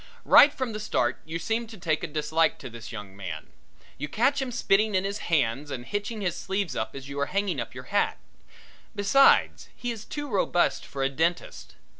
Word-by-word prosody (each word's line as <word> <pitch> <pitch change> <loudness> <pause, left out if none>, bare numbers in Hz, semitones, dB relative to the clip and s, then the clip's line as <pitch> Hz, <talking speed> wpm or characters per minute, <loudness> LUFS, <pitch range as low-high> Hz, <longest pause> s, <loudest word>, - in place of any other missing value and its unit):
Right 290 - +8
from 260 -5 -3
the 215 - -4
start 130 - 0
you 160 +1 -4
seem 225 +6 -2
to 220 -1 -11
take 160 -4 -1
a - - -1
dislike 155 +2 +1
to 130 - -9
this 115 0 -9
young 105 -4 -8
man. 85 -6 -7 0.5
You 145 - -3
catch 270 - +2
him 260 -2 -3
spitting 215 -2 +2
in 185 - +2
his 200 +1 -3
hands 145 -2 +1
and 125 -3 -5
hitching 205 - -3
his 180 -4 -1
sleeves 190 -8 -2
up 110 - -3
as 135 -1 -8
you 140 0 -5
are 140 - 0
hanging 200 0 -1
up - - -7
your - - -7
hat. - - +2 0.8
Besides 210 +7 +4
he 245 - -3
is 220 -2 -7
too 290 +4 -5
robust 190 -6 +1
for 135 -1 -3
a 135 - +2
dentist. 165 +5 -2
175 Hz, 205 wpm, -27 LUFS, 140-215 Hz, 0.8 s, Right